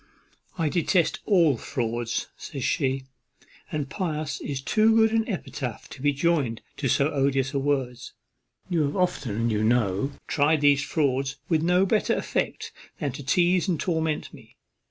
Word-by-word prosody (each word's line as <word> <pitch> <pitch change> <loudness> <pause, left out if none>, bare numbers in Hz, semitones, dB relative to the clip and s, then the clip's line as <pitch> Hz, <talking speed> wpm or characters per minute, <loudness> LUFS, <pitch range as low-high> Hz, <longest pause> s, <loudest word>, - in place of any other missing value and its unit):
"I 165 -3 +1
detest 170 +1 +1
all 170 - +4
fraud," 120 -2 -3 0.3
says 135 -4 -7
she; 135 -1 0 0.7
"and 150 -2 -2
pious 155 -2 -3
is 140 -2 -3
too 215 +10 +3
good 220 -1 +5
an 225 +1 +1
epithet 135 - -4
to - - -10
be 145 +1 +3
joined 145 -6 0 0.2
to 140 - -1
so 140 +4 +2
odious 135 -1 +1
a 140 - +1
word. 135 -3 -1 0.7
You 175 -3 +1
have 145 -1 0
often, 120 - 0
you 105 0 0
know, 110 +2 +1
tried 150 +1 +2
these 145 -1 +5
frauds 135 -3 0
with 160 -3 +2
no 180 +3 +3
better 215 +2 +2
effect - - -2 0.3
than 145 -4 -2
to 135 - -8
teize 175 +6 +2
and 170 -5 0
torment 160 -3 -1
me. - - -15
145 Hz, 155 wpm, -26 LUFS, 130-170 Hz, 0.7 s, good